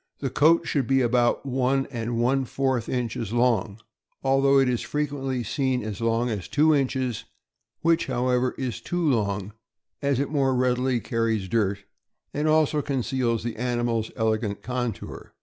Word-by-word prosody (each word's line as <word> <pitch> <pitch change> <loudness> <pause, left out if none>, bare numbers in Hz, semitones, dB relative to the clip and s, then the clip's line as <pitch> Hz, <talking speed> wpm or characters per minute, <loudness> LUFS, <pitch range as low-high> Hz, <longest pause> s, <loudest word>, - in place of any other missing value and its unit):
The 135 -3 -3
coat 160 +5 +4
should 135 -5 0
be 135 0 +3
about 120 +1 +2
one 135 0 +1
and 115 -1 -3
one 130 +3 +2
fourth 130 -2 -1
inches 115 -4 -2
long, 115 -3 +1 0.4
although 135 +1 +4
it 135 -1 +4
is 125 -2 0
frequently 135 -4 -2
seen 130 +2 -1
as 105 0 -5
long 115 +1 +1
as 95 -5 -4
two 155 - +3
inches, 130 -4 -1 0.6
which, 165 0 +2
however, 125 0 0
is 120 -4 -4
too 175 +5 -1
long, 105 -5 0 0.5
as 140 -2 +1
it 140 - +1
the - - -11
more 135 -3 +2
readily 125 -1 +1
carries 115 -5 -1
dirt, 100 -1 0 0.5
and 150 +2 0
also 155 -1 +3
conceals 130 -4 -1
the 120 -1 -4
animal's 120 -2 -1
elegant 110 -2 -1
contour. 125 -3 -5
125 Hz, 155 wpm, -25 LUFS, 115-135 Hz, 0.6 s, coat